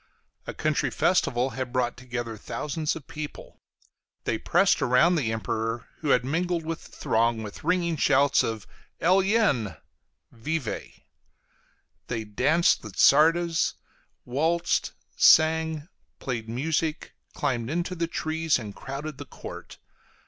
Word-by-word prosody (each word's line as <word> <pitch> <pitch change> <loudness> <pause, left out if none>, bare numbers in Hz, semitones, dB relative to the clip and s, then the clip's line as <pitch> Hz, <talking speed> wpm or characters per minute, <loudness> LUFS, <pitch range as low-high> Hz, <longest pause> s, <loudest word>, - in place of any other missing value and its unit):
A - - -4
country - - 0
festival 125 +2 +1
had 130 -2 -4
brought 125 -1 0
together 120 -2 -5
thousands 150 +8 -3
of 155 -4 -9
people; 150 -1 -8 0.6
they - - -1
pressed - - +3
about 125 +8 +4
the 130 -9 0
Emperor, 110 +1 -3
who 155 - -3
had 125 -2 +3
mingled 170 +3 -1
with 165 0 -5
the - - -15
throng, 115 0 +1
with 105 -1 -9
ringing 170 -1 +1
shouts 140 0 +4
of 110 -3 -3 0.3
"eljen" 185 - +2 0.5
[vive]; 135 +1 -4 1.1
they 115 -3 -3
danced 155 +11 +2
the 110 - -8
csardas, 165 - +4 0.5
waltzed, 160 +7 0 0.3
sang, 160 -1 +4 0.3
played 115 -4 -4
music, 155 +5 -2 0.2
climbed 120 -2 -1
into 175 +4 -2
the 170 -1 -2
trees, 160 -1 0
and 105 -5 -8
crowded 140 +1 -6
the 145 - -7
court. - - -10
145 Hz, 125 wpm, -26 LUFS, 120-165 Hz, 1.1 s, about